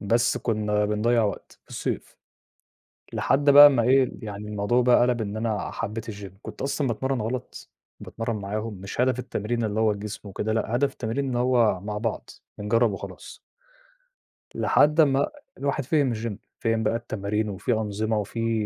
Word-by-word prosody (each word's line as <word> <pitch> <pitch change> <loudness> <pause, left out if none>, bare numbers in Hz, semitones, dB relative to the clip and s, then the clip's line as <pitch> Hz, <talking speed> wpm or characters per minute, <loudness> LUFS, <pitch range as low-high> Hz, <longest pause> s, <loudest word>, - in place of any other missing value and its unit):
بس 115 +4 +2
كنّا 105 -2 0
بنضيّع 110 +3 +2
وقت 100 - -5
في - - -28
الصيف، - - -4 1.0
لحد 145 +1 +2
بقى 145 +1 +11
أمّا 135 -5 +4
إيه 130 +2 +4
يعني 105 0 -6
الموضوع 105 +4 +1
بقى 125 0 +5
قَلَب 120 -1 +2
إن 105 -1 -3
أنا 110 -1 -2
حبّيت 115 +2 -5
الgym 100 -3 -9
كنت - - -8
أصلًا 140 0 -1
باتمرّن 130 +2 -1
غلط، 120 +3 -5 0.3
باتمرّن 115 0 -4
معاهم 105 +2 -4
مش 100 +4 -6
هدف 125 0 +2
التمرين 120 -1 -2
اللي 110 0 -1
هو 110 -1 +3
جسم 105 0 -7
وكده 105 +3 -2
لأ 110 +1 -1
هدف 140 +2 +1
التمرين 120 +4 -3
إن 125 - -2
هو 120 -6 +3
مع 105 +2 -4
بعض، 115 0 -3 0.3
بنجرّب 115 +2 +2
وخلاص. 95 - -9 1.2
لحد 150 +2 +3
أمّا 140 -3 +4 0.3
الواحد 140 0 -1
فهِم 140 -4 +2
الgym 110 -1 -4 0.2
فهِم 115 -1 0
بقى 110 +1 +1
التمارين 105 -2 -2
وفي 100 +5 -1
أنظمة 110 0 -1
وفي 115 +1 -1
115 Hz, 165 wpm, -25 LUFS, 105-125 Hz, 1.2 s, بقى